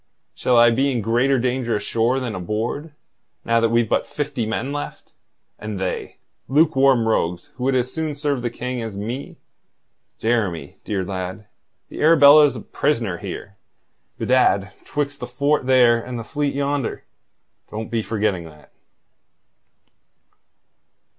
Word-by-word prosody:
"Shall 125 -1 +1
I 120 0 +7
be 135 +4 +2
in 120 -3 -1
greater 120 +5 +2
danger 125 -2 0
ashore 115 +5 0
than 125 -4 -4
aboard, 110 - -3 0.5
now 115 0 +3
that 115 0 +2
we've 115 0 +2
but - - 0
fifty 145 -6 -3
men 115 +5 -2
left, 145 0 -6 0.5
and 105 -1 -5
they 95 -1 -4 0.3
lukewarm 135 -5 +4
rogues 90 -5 -1
who 125 - -5
would 135 0 +2
as 125 0 0
soon 160 -2 -2
serve 145 -3 -1
the 120 - -1
King 125 +1 -4
as 110 -3 -6
me? 115 +7 -5 0.8
Jeremy, 100 -11 -1
dear 100 -3 -2
lad, 95 +2 -5 0.4
the - - -7
Arabella's 150 -2 +7
a - - -6
prisoner 115 - -1
here, 100 -1 -7 0.6
bedad, 100 -7 +2
'twixt 145 -1 -3
the 125 - -5
fort 140 +2 0
there 120 -3 +5
and 125 -1 -6
the 115 - -5
fleet 145 +3 -2
yonder. 140 -2 -2 0.7
Don't 110 +1 -6
be 115 -1 0
forgetting 105 -5 -1
that." 75 -2 -15
120 Hz, 140 wpm, -22 LUFS, 110-140 Hz, 0.8 s, I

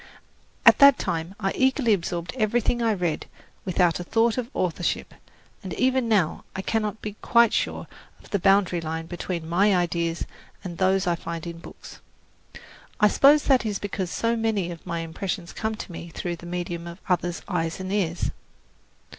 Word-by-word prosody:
At - - +8
that 280 -1 +8
time 165 +3 -3
I 195 -2 0
eagerly 260 -3 +3
absorbed 170 -2 -3
everything 240 +1 +1
I 230 -1 +2
read 175 -5 -2 0.4
without 180 -2 +2
a - - -4
thought 225 +4 +2
of 250 -2 -3
authorship, 175 -1 -1 0.5
and 185 -5 -6
even 260 -2 +1
now 190 -8 +1
I 190 - -3
cannot 215 0 -2
be 210 -1 -5
quite 235 -1 +4
sure - - -1 0.3
of - - -18
the 200 - +1
boundary 195 -2 +3
line 160 0 -4
between 175 -1 -5
my 195 +4 +3
ideas 170 -1 -1 0.4
and 175 -3 -7
those 190 +1 +2
I 175 - +2
find 170 0 -5
in 170 -1 -7
books. - - -12 1.0
I 210 -2 +6
suppose 290 +7 +5
that 265 -3 +3
is 210 -3 -1
because 195 -3 -4
so 230 +5 0
many 220 -6 0
of 170 +1 -10
my 170 -1 -2
impressions 170 +2 -4
come 220 0 -2
to 215 - -8
me 170 0 -8
through 175 +1 -4
the 170 - -11
medium 175 -1 -4
of 170 0 -8
others' 175 -1 -1
eyes 165 -3 -2
and 190 +1 -4
ears. 175 -4 0
185 Hz, 175 wpm, -25 LUFS, 170-215 Hz, 1.0 s, At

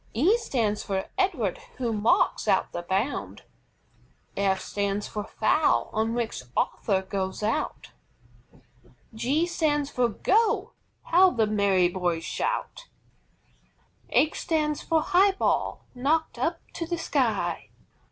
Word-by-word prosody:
E 335 - +4
stands 230 - -1
for 190 -1 -2
EDWARD, 275 - 0 0.2
who 240 -3 -1
marks 215 +1 +2
out - - +2
the 175 - -4
bound. 195 +9 -2 0.9
F 195 -1 +1
stands 200 +1 -2
for 210 - -4
FOUL 305 +8 +1
on 225 +1 0
which 235 - -2 0.2
Arthur 190 -3 0
goes 190 +1 -3
out. 220 +2 -2 1.2
G 270 +9 +1
stands 295 -4 0
for 245 -1 +1
"GO" 435 - +1 0.3
How 370 +2 +5
the 230 -10 +1
merry 200 -4 +3
boys 175 -2 -1
shout! - - -3 1.2
H 315 - +2
stands 300 -2 0
for 320 -2 +1
HIGH 390 +2 +4
BALL, - - 0
knocked 295 +6 0
up - - -1
to 330 - -4
the 345 0 -2
sky. - - -1
240 Hz, 125 wpm, -26 LUFS, 200-330 Hz, 1.2 s, How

